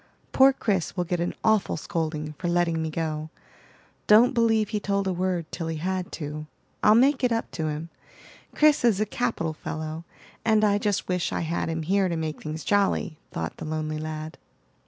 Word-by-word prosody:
Poor 265 +1 +7
Chris 200 -9 -1
will 180 - +2
get 175 0 -2
an 175 - -2
awful 220 -5 +2
scolding 155 -1 -3
for 180 - -2
letting 170 -2 +1
me 160 - -2
go. 155 -1 -3 0.8
Don't 220 +4 +7
believe 225 -3 +2
he 215 - -1
told 200 -1 -1
a 190 - 0
word 180 -1 -1
till 165 - -4
he 165 -1 -3
had 185 +2 -2
to. 150 -1 -5 0.4
I'll 210 - +7
make 265 +3 +4
it 250 - +3
up 230 0 -1
to 160 - -2
him. 155 +2 -4 0.7
Chris 300 -3 +4
is 225 -5 +4
a 215 - +2
capital 215 -8 -2
fellow, 155 +1 -5 0.4
and 220 -1 +3
I 205 -1 +3
just 205 -2 -1
wish 180 -2 -1
I - - -1
had 165 0 -2
him 160 0 -2
here 190 +3 +2
to 170 - -1
make 160 -1 -4
things 155 0 -5
jolly," 200 -6 +1
thought 80 0 -5
the - - -6
lonely 155 0 -3
lad. 155 0 -6
175 Hz, 195 wpm, -26 LUFS, 155-210 Hz, 0.8 s, Poor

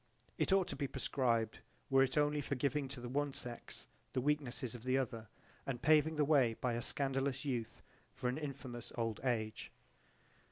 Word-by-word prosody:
"It - - +2
ought 190 -2 +4
to - - -3
be 140 - -1
proscribed 115 -5 0 0.3
were 135 0 +6
it 135 +2 +2
only 150 0 +3
for 140 - -2
its - - -8
giving 140 0 +1
to 135 -1 -6
the 120 - -5
one 140 +2 0
sex 120 -2 -7 0.3
the - - +1
weaknesses 130 -4 0
of 120 -2 -8
the 130 +1 +2
other 115 -4 -2 0.4
and 130 -3 -3
paving 155 +3 +4
the 150 -1 +3
way 135 -6 +4
by 125 +1 -1
a 120 - -1
scandalous 135 +1 0
youth 120 -5 -3 0.3
for 125 - -3
an 125 +4 0
infamous 130 -5 -6
old 115 -2 -1
age." 110 -4 -1
130 Hz, 190 wpm, -36 LUFS, 120-145 Hz, 0.4 s, were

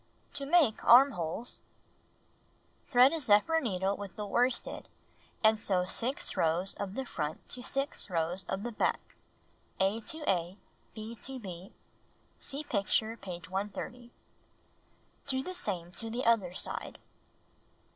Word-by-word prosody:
To 280 -1 -3
Make 295 -8 +4
Armholes 235 - +4 1.3
Thread 255 +2 +7
a 325 - 0
zephyr 255 +6 +4
needle 195 -4 0
with 200 -2 -8
the 210 - -4
worsted, 245 +5 0 0.6
and 220 0 +5
sew 185 -3 +2
6 245 +8 -2
rows 170 +4 +1
of 200 0 -5
the 265 - -2
front 150 -9 -4
to 250 - -4
6 275 -2 -2
rows 175 +2 -1
of 190 +1 -2
the 240 - -3
back 215 - +1 0.8
(A 195 +4 +2
to 315 -2 -3
A, 180 0 +1 0.4
B 220 +1 -6
to 270 0 -5
B. 185 -4 -8 0.7
Sec 290 +2 -3
picture, 220 +2 +1
page 180 -5 -8
130). 205 +6 -4 1.2
Do 265 -1 +2
the 370 - -5
same 185 - -2
to 225 +4 -5
the 240 +3 -3
other 205 -6 +3
side. - - -3
215 Hz, 135 wpm, -31 LUFS, 190-255 Hz, 1.3 s, Thread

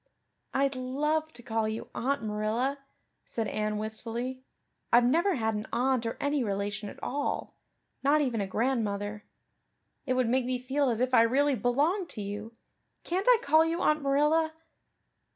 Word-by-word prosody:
"I'd 275 0 +1
love 300 +5 -1
to 240 - -13
call 225 -1 0
you 220 +1 -5
Aunt 275 +1 -1
Marilla," 220 +6 -1 0.4
said 225 -2 -3
Anne 215 0 -1
wistfully. 230 +4 -4 0.5
"I've 240 +1 +6
never 340 +8 +3
had 220 -3 0
an 210 0 -4
aunt 250 0 +1
or 225 - -4
any 285 -2 +1
relation 200 0 -2
at - - -11
all 285 +2 -2 0.5
not 285 +3 +4
even 250 -7 0
a 195 - -2
grandmother. 210 -2 -1 0.8
It 255 - +2
would 255 -2 +2
make 255 +1 +2
me 255 0 0
feel 265 +2 0
as 230 0 -1
if 255 0 0
I 240 - +7
really 275 +5 +3
belonged 290 - +1
to - - -3
you. 205 +3 -5 0.5
Can't 375 +5 -2
I - - +8
call 315 -6 +5
you 330 +1 -1
Aunt 305 0 +3
Marilla?" 300 +3 +2
255 Hz, 165 wpm, -29 LUFS, 220-285 Hz, 0.8 s, I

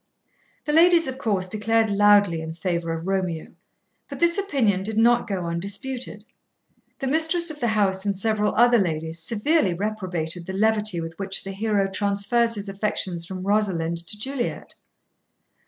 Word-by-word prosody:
The 295 - -1
ladies, 335 +1 +6
of 260 -1 -5
course, 200 -7 -1
declared 220 +2 +1
loudly 200 -4 +4
in 160 0 -6
favour 170 -2 -2
of 165 0 -4
Romeo, 185 -4 -2 0.6
but - - -7
this 340 +2 +3
opinion 255 - +1
did 215 +2 -3
not 240 +1 +4
go 190 -4 -3
undisputed. 205 +6 -4 0.7
The 270 - -4
mistress 320 +4 +1
of 300 - -10
the 240 - 0
house 200 -3 +1
and 200 -1 0
several 210 +1 0
other 240 0 +5
ladies 160 -3 -1
severely 210 - +1
reprobated 180 -4 -4
the 190 - -4
levity 210 -2 +1
with 165 +1 -7
which 195 -1 -2
the 195 - -6
hero 200 0 0
transfers 205 +4 0
his 205 -1 -6
affections 190 -4 -3
from 185 0 -6
Rosalind 190 -5 0
to 210 - -7
Juliet. 260 +2 -4
205 Hz, 155 wpm, -24 LUFS, 185-230 Hz, 0.7 s, ladies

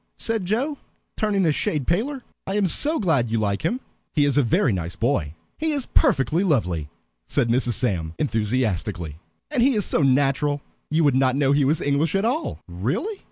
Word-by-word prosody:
said 225 -4 -2
Joe, 265 +9 -1 0.4
turning 205 -4 +1
a 160 - +4
shade 145 -1 -1
paler. 245 - -1 0.2
"I 195 - -2
am 205 -1 +2
so 295 - +3
glad 160 - +1
you 115 - 0
like 100 -2 0
him. 250 +3 -1 0.3
He 145 -2 +4
is 140 - +1
a 145 - +5
very 120 -1 +2
nice 85 -2 -4
boy." 110 - -1 0.2
"He 315 0 0
is 280 -4 -1
perfectly 175 - +2
lovely," 90 - 0 0.4
said 115 - +1
Mrs. 120 0 +1
Sam, 90 -8 -2
enthusiastically. 105 - -1 0.3
"And - - +1
he 260 +1 +4
is 205 -4 +1
so - - +1
natural, 140 +1 +2 0.3
you 160 +2 +2
would 145 -3 +4
not 130 0 +2
know 140 -1 +2
he 140 -1 +3
was 150 +4 +2
English 145 +4 +1
at 195 +2 +1
all." 285 +8 -2
"Really?" 130 - -3
145 Hz, 190 wpm, -23 LUFS, -, 0.4 s, a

